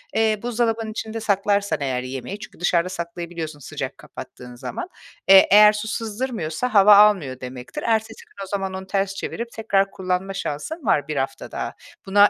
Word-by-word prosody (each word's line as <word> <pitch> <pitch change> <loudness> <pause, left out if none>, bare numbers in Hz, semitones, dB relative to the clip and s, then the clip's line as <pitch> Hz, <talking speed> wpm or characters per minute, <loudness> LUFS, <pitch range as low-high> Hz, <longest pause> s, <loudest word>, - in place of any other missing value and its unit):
eee, 220 -1 +2
buzdolabının 230 -2 -1
içinde 220 0 -5
saklarsan 200 -5 +1
eğer 130 -2 -1
yemeği 135 +10 -6
çünkü 205 - -11
dışarıda 175 0 +1
saklayabiliyorsun 170 -3 -6
sıcak - - -6
kapattığın 125 0 -11
zaman. 350 - -6 0.4
Eee, 190 0 +8
eğer 210 +1 +8
su 210 +1 -4
sızdırmıyorsa 225 -2 -3
hava 205 0 +8
almıyor 195 -11 +4
demektir. 125 - -7
Ertesi 225 - -1
gün 425 - -10
o - - -8
zaman 195 -1 -3
onu 190 0 -6
ters 195 0 -1
çevirip 235 +3 -5
tekrar 200 -4 +1
kullanma 185 +1 -2
şansın 220 - -5
var 145 -7 +2
1 155 - -3
hafta 135 -3 -3
daha. - - -4 0.3
Buna 205 +1 +6
195 Hz, 165 wpm, -22 LUFS, 170-220 Hz, 0.4 s, Eee